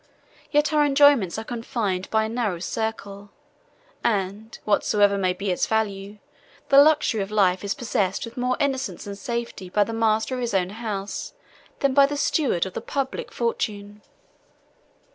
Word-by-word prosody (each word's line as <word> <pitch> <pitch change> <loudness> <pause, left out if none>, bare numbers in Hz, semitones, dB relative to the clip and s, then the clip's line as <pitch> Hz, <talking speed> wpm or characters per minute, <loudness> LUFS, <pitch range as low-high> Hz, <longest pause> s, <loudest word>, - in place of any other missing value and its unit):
Yet 295 +1 +2
our 300 -1 +4
enjoyments 280 -10 +4
are 220 - -4
confined 220 -5 -3
by 220 0 +2
a - - -1
narrow 225 -6 -1
circle; 205 +1 -4 0.7
and, 210 +1 -2
whatsoever 205 -1 +3
may 185 -2 +1
be 190 +2 -3
its 180 - 0
value, 205 -2 -2 0.5
the 275 0 +8
luxury 295 -7 +3
of 195 - -4
life 195 -3 +2
is 200 - -2
possessed 220 -7 -1
with 230 - -11
more 250 0 0
innocence 265 - -2
and 200 -1 -6
safety 235 -4 -5
by 205 +3 +3
the 225 - -6
master 225 +2 +1
of 255 - -3
his 235 -4 -2
own, 190 +1 0 1.1
than 275 -1 +2
by 280 0 +6
the 290 0 -4
steward 275 - +1
of 190 - -7
the - - -4
public, 275 -1 -4
fortune. 210 -3 -3
220 Hz, 160 wpm, -24 LUFS, 200-250 Hz, 1.1 s, the